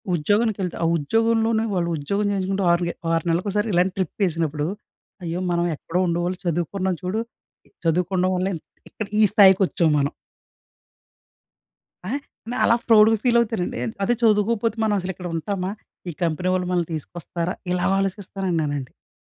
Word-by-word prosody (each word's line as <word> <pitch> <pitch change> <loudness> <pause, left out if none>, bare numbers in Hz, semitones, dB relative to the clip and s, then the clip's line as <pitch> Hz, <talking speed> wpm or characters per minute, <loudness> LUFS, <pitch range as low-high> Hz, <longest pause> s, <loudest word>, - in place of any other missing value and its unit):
ఉద్యోగానికి 205 +7 +1
వెళ్తే, 180 -2 -3
ఆ - - +3
ఉద్యోగంలోనే 225 +6 +1
వాళ్ళు, 170 -2 0
ఉద్యోగం 200 +8 -1
చేయించుకుంటూ 195 0 -1
ఆరు 175 0 +1
గే 170 - -2 0.2
ఆరు 165 -1 +1
నెలలకు 170 +5 0
ఒకసారి 210 +2 0
ఇలాంటి 180 +1 +2
ట్రిప్ 185 -4 -2
వేసినప్పుడు, 160 -4 0 0.6
అయ్యో! 170 +1 -3
మనం 170 0 +1
ఎక్కడో 170 +4 -3
ఉండేవాళ్ళం, 175 +2 -1
చదువుకున్నాం 175 +2 -1
చూడు, 190 +5 -1 0.6
చదువుకోవడం 180 +2 +1
వల్లే 185 +2 0
ఇంత్ 160 - -10 0.2
ఇక్కడ 215 - -5
ఈ - - +7
స్థాయికి 195 -2 +7
వచ్చాం 170 -2 +1
మనం. 140 +1 0 2.0
ఆ! - - -3 0.4
నేను 245 - -2
అలా 235 - +5
ప్రౌడ్‍గా 225 0 +6
ఫీల్ 240 -1 +4
అవుతానండి. 225 -6 -1 0.3
అదే 240 - +3
చదువుకోకపోతే 225 +1 +2
మనం 215 - +2
అసలు 185 +1 -3
ఇక్కడ 180 0 -7
ఉంటామా? 185 +3 -2 0.4
ఈ - - -3
కంపెనీ 170 +2 -1
వాళ్ళు 180 -1 0
మనల్ని 175 -2 +1
తీసుకొస్తారా? 170 +3 -4 0.2
ఇలాగ 180 +1 +1
ఆలోచిస్తానండి 195 -2 -2
నేనండి.ఇంద్ 145 -3 -6
185 Hz, 155 wpm, -23 LUFS, 170-210 Hz, 2.0 s, ఈ